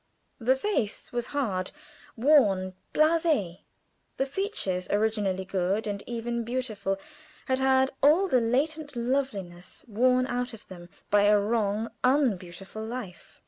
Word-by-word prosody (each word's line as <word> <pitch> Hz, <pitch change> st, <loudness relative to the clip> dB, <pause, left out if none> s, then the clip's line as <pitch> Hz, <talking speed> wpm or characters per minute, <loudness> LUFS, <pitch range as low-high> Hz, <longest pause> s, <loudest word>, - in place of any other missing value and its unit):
The 255 Hz, +2 st, +3 dB
face 265 Hz, -, -2 dB
was 240 Hz, -1 st, -2 dB
hard, 205 Hz, -10 st, -1 dB, 0.5 s
worn, 220 Hz, -9 st, +3 dB, 0.2 s
blasé; 310 Hz, -, +2 dB, 0.6 s
the 270 Hz, -, +1 dB
features, 270 Hz, -, -2 dB
originally 205 Hz, -3 st, 0 dB
good, 190 Hz, +3 st, -1 dB
and 200 Hz, -1 st, -3 dB
even 235 Hz, 0 st, -3 dB
beautiful, 220 Hz, -5 st, -2 dB, 0.5 s
had 260 Hz, -1 st, 0 dB
had 265 Hz, 0 st, +3 dB
all 325 Hz, +7 st, +5 dB
the 255 Hz, -8 st, +3 dB
latent 290 Hz, +5 st, -1 dB
loveliness 235 Hz, -9 st, -3 dB
worn 250 Hz, +3 st, +3 dB
out 245 Hz, -1 st, -3 dB
of 220 Hz, -, -12 dB
them 175 Hz, -2 st, -11 dB, 0.2 s
by 205 Hz, 0 st, +5 dB
a 210 Hz, 0 st, +5 dB
wrong, 215 Hz, +1 st, 0 dB
unbeautiful 215 Hz, -, 0 dB
life. 220 Hz, -6 st, -8 dB
230 Hz, 125 wpm, -27 LUFS, 200-265 Hz, 0.6 s, all